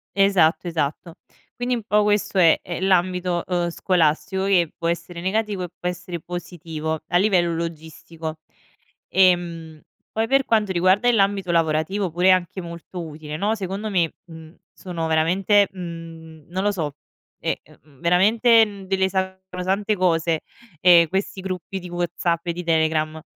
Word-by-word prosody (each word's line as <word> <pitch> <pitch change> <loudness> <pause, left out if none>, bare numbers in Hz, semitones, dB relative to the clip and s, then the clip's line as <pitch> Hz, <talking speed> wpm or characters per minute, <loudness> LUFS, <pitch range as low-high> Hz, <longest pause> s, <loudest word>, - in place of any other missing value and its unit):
Esatto, 190 -4 +3
esatto. 160 +1 -3 0.4
Quindi 245 0 -1
un 230 - -5
po' 210 0 +2
questo 205 -1 0
è 165 -3 +6
è 175 - -5
l'ambito, 180 -1 +1
uhm, 175 -1 -1
scolastico 180 +2 +1
che 180 -5 +2
può 165 - -3
essere 170 +1 -3
negativo 205 0 -1
e - - -3
può 180 - -2
essere 180 0 -6
positivo 160 -2 -5
a 175 - +2
livello 180 -3 +2
logistico. 160 -1 -6 0.7
Ehm, 170 -4 +1 0.3
poi 220 +1 -1
per 270 +2 +3
quanto 215 -3 +1
riguarda 185 +6 +3
l'ambito 195 -4 +1
lavorativo 165 +4 +1
pure 180 +3 +3
anche 185 +1 0
molto 170 +1 -8
utile, 150 -1 -8
no: 205 +6 0
secondo 200 +1 -4
me, 175 -5 +1
mhmm, 160 0 -13 0.2
sono 170 -3 -5
veramente, 185 +6 +3
mhmm 165 -3 -9
non 185 +2 -2
lo 205 - +2
so, 155 -7 -3 0.4
è, - - -3
e - - -1
ehm, 145 -4 -22
veramente, 220 - +5
mhmm, 200 -2 -10
delle 190 0 +1
sacrosante 190 +2 -2
cose, 165 -3 +1 0.4
ehm, 170 -1 +6
questi 190 +1 -2
gruppi 185 0 -5
di 180 -1 -9
WhatsApp 175 0 -2
e 170 - 0
di 180 +1 -6
Telegram 160 -1 +1
180 Hz, 150 wpm, -22 LUFS, 165-195 Hz, 0.7 s, è